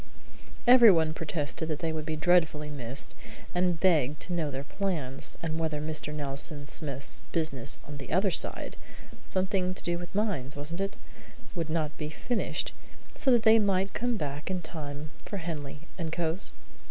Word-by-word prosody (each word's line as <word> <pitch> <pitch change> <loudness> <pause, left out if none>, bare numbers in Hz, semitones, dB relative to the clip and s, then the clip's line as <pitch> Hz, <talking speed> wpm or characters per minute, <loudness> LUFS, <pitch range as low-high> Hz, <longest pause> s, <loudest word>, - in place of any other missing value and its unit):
Everyone 205 -11 +8
protested 155 0 -1
that 155 - 0
they 160 0 -1
would 155 0 -4
be 155 - 0
dreadfully 155 -2 +3
missed, 135 -1 -4 0.4
and 180 -2 +2
begged 150 -6 +3
to 180 - -3
know 165 -4 0
their 135 0 -4
plans, 150 -7 -3
and 160 -1 -1
whether 155 -2 0
Mr. 155 0 0
Nelson 145 0 -2
Smith's 140 -2 -2
business 145 -5 +1
on 145 0 -6
the 135 - -8
other 190 +4 +3
side - - 0 0.5
(something 185 -1 +1
to - - -3
do 175 0 0
with 175 +2 -8
mines, 190 - 0
wasn't 150 +6 -3
it?) 195 0 -1 0.6
would 165 -4 -2
not 155 -2 0
be 150 -1 -2
finished, 235 +10 -1 0.4
so 285 - +1
that 240 -3 +5
they 225 0 +8
might 195 -2 +2
come 245 -1 0
back 145 -2 -3
in 185 -2 -1
time 150 -1 -6
for 200 - -4
Henley 150 -5 -5 0.2
and 165 -2 -2
Cowes? 170 +2 -1
160 Hz, 165 wpm, -29 LUFS, 150-185 Hz, 0.6 s, Everyone